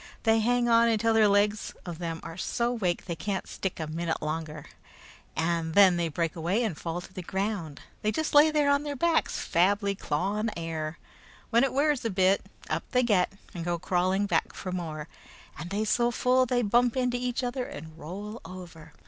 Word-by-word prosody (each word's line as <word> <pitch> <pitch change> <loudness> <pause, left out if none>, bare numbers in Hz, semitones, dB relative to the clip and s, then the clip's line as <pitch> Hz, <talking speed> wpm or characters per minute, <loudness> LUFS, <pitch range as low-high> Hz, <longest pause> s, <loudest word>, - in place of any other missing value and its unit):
They 225 -1 +4
hang 240 +2 +2
on 230 0 +5
until 225 0 +2
the 220 -2 +5
legs 205 +1 +1
of 170 -2 -6
them 165 -2 -4
are 165 -1 -7
so 235 +6 -1
wake 185 -7 -1
they 170 - -3
can't 190 +4 -3
stick 190 -3 -4
a 160 - -2
minute 160 +1 -2
longer, 155 -1 -4 0.7
and 165 -1 -1
then 195 -3 +7
they 170 -1 0
break 165 +1 -2
away 175 +8 0
and 215 -8 -1
fall 170 +3 -4
to 180 - -13
the 185 - -5
ground. 190 -4 -3 0.2
They 215 - +1
just 315 +5 -2
lay 295 +2 +8
there 300 -2 +2
on 280 0 +3
their 295 -1 -4
backs, 335 +3 +1
fably 200 +3 +2
clawing 200 +7 -1
air. 165 -1 -4 0.5
When 235 +2 +5
it 270 - +2
wears 290 0 +2
off - - -12
a - - +2
bit, 190 0 +3 0.2
up - - -1
they 250 0 +4
get, 200 -7 +2 0.2
and 170 - -5
go 175 0 -1
crawling 185 +3 +1
back - - 0
for 185 - -5
more, 160 -4 -4 0.5
and 170 - -6
they 205 +3 -1
so 235 +2 +2
full 255 +2 +2
they 245 0 +1
bump 240 +4 +3
into 250 -1 +1
each 250 +1 -2
other 250 +1 -2
and 160 -4 -9
roll 200 +8 -7
over. 170 -4 -11
195 Hz, 200 wpm, -28 LUFS, 170-235 Hz, 0.7 s, lay